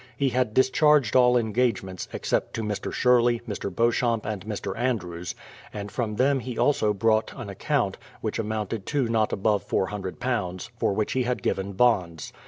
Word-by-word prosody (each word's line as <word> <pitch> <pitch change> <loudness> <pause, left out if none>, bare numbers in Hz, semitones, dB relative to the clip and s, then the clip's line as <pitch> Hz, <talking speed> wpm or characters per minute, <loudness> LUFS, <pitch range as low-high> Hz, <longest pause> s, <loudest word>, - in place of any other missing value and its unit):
He 140 0 +2
had 125 -3 0
discharged 140 -1 +4
all 125 -1 +6
engagements, 110 -5 -1
Except - - -1
to 115 - -2
Mr. 105 -2 -3
Sherley, 120 -1 +3
Mr. 100 -2 -3
Beauchamp, 115 +2 +1
and 105 -3 -4
Mr, 105 -2 -4
Andrews; 90 -9 -2 0.4
and 100 -1 -6
from 110 -1 -2
them 135 +4 +3
he 125 -1 -6
also 110 -7 +2
brought 110 +2 +1
an 120 -6 -6
account, 95 - -1 0.2
which - - -3
amounted 110 -1 -3
to 140 -5 +1
not 110 -2 +1
above 105 +1 0
£400, 100 0 -2
for - - +1
which 105 +1 -1
he 130 - +1
had 125 0 -2
given 100 +1 -1
bonds. 95 - +1
110 Hz, 165 wpm, -26 LUFS, 100-125 Hz, 0.4 s, all